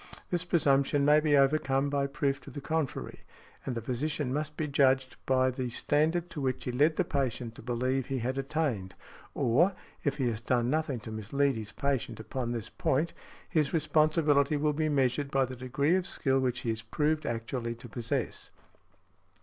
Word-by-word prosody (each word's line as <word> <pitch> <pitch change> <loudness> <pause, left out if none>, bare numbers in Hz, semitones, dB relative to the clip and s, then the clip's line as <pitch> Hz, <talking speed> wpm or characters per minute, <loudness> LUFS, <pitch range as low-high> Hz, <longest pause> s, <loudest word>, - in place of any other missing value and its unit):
This 175 0 0
presumption 140 -4 +3
may 150 +1 +6
be 150 -2 +3
overcome 135 -1 +3
by 140 -1 +1
proof 140 -1 -1
to - - -11
the 145 - -7
contrary; 155 -1 -3 0.5
and 130 - -1
the 115 - -4
physician 130 +2 -2
must 150 +1 -3
be 155 - -1
judged 130 -2 +2
by 130 0 +3
the 130 0 -3
|62| - - -6
standard 160 +6 +1
to 150 - -5
which 130 -1 -1
he 125 - -2
led 150 +6 +3
the - - +2
patient 125 -4 -2
to - - -11
believe 125 +2 -1
he 135 -1 -2
had 130 +3 -2
attained; 135 -10 -2 0.4
or, 170 +12 +3 0.3
if 145 -2 0
he 130 -4 +1
has 110 -1 -2
done 120 0 +1
nothing 155 -5 0
to 110 - -8
mislead 135 +6 0
his 110 -1 -6
patient 135 +3 -2
upon 120 +2 -3
this 115 -1 -4
point, 150 +6 0 0.3
his 155 -1 +1
responsibility 155 -2 +3
will 150 +1 +1
be 155 +1 0
measured 140 0 +1
by 135 -1 +2
the 130 0 -7
degree 135 +5 0
of 185 0 +1
skill 135 -6 +1
which 125 -2 0
he 115 - -1
is 110 0 -3
proved 150 +7 0
actually 115 +1 -3
to 120 +2 -11
possess. 115 0 -3
135 Hz, 190 wpm, -30 LUFS, 125-150 Hz, 0.5 s, may